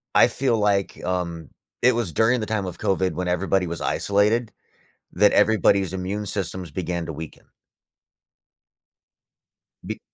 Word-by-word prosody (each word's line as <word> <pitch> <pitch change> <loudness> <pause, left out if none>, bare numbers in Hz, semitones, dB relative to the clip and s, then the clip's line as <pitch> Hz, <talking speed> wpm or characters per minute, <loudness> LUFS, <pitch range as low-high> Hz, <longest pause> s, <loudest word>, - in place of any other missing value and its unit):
I - - +6
feel 125 -4 0
like 100 -2 0
um, 85 -3 -3 0.3
it 125 - +6
was 115 -7 -2
during 115 +7 +2
the 110 - -4
time 110 -3 -1
of 90 -2 -7
COVID, 95 -1 +1
when 90 +3 -3
everybody 90 +1 +1
was 85 0 -5
isolated, 105 +3 +1 0.6
that 105 +3 +4
everybody's 100 -3 +3
immune 100 +3 -3
systems 95 -3 -4
began 85 +1 -3
to 80 - -5
weaken. 80 0 -9 2.4
Be - - -5
95 Hz, 135 wpm, -23 LUFS, 90-105 Hz, 2.4 s, I